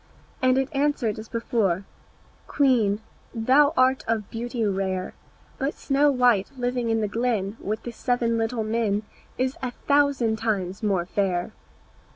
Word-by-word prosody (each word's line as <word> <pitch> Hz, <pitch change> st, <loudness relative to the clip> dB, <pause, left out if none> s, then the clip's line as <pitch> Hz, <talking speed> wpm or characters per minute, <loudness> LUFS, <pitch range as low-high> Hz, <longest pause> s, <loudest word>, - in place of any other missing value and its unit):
And 255 Hz, 0 st, +4 dB
it 270 Hz, +1 st, -1 dB
answered 275 Hz, -7 st, 0 dB
as 220 Hz, -, -9 dB
before, 210 Hz, -6 st, 0 dB, 0.6 s
"Queen, 230 Hz, -7 st, +2 dB, 0.3 s
thou 265 Hz, +6 st, +4 dB
art 260 Hz, +1 st, +3 dB
of 220 Hz, -3 st, -1 dB
beauty 235 Hz, 0 st, -2 dB
rare, 190 Hz, -2 st, -1 dB, 0.5 s
But 275 Hz, +2 st, -1 dB
Snow 285 Hz, +1 st, +2 dB
white 245 Hz, -7 st, +3 dB
living 245 Hz, -1 st, -1 dB
in 225 Hz, 0 st, +1 dB
the 210 Hz, -, 0 dB
glen 220 Hz, -2 st, -1 dB
With 215 Hz, +2 st, -3 dB
the 240 Hz, -, -5 dB
seven 235 Hz, -1 st, 0 dB
little 225 Hz, 0 st, -1 dB
men 215 Hz, -2 st, 0 dB, 0.3 s
Is 260 Hz, +1 st, -1 dB
a 255 Hz, -, -1 dB, 0.2 s
thousand 280 Hz, -6 st, +3 dB
times 200 Hz, -4 st, -2 dB
more 195 Hz, -5 st, +1 dB
fair." 185 Hz, 0 st, -1 dB
230 Hz, 145 wpm, -25 LUFS, 205-255 Hz, 0.6 s, And